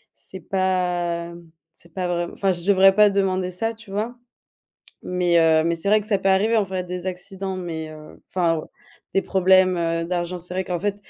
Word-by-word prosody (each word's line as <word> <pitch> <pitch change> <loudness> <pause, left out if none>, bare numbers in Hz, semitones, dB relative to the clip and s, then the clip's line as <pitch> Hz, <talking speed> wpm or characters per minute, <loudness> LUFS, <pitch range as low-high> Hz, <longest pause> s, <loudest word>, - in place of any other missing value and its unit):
c'est 190 - -10
pas, 175 -3 -1
mmh, 170 -1 -15 0.3
c'est 170 -1 -21
pas 185 -2 -2
vraim 175 -1 -2
enfin 195 -2 +1
je 170 -1 -5
devrais 195 -1 +5
pas 210 -1 +6
demander 190 -2 0
ça 225 +6 -2
tu 220 -3 -15
vois? 220 +5 -3 0.9
Mais 180 -1 +2
heu, 160 -1 +4
mais 170 0 0
c'est 165 - -7
vrai 215 +1 +5
que 210 - -8
ça 200 -3 +2
peut 195 - 0
arriver 210 +4 +3
en 210 - +3
fait 185 -1 -3
des 180 +1 -6
accidents, 190 +1 -5
mais 165 -3 -5
heu 155 0 -13
enfin 170 -3 +1
ou, - - -6 0.5
des 195 - +3
problèmes, 185 -1 +4
heu, 165 0 -1
d'argent. 175 0 -2
C'est 180 +1 -7
vrai 185 0 -1
qu'en 175 -2 -3
fait 205 0 -1
185 Hz, 210 wpm, -22 LUFS, 170-195 Hz, 0.9 s, pas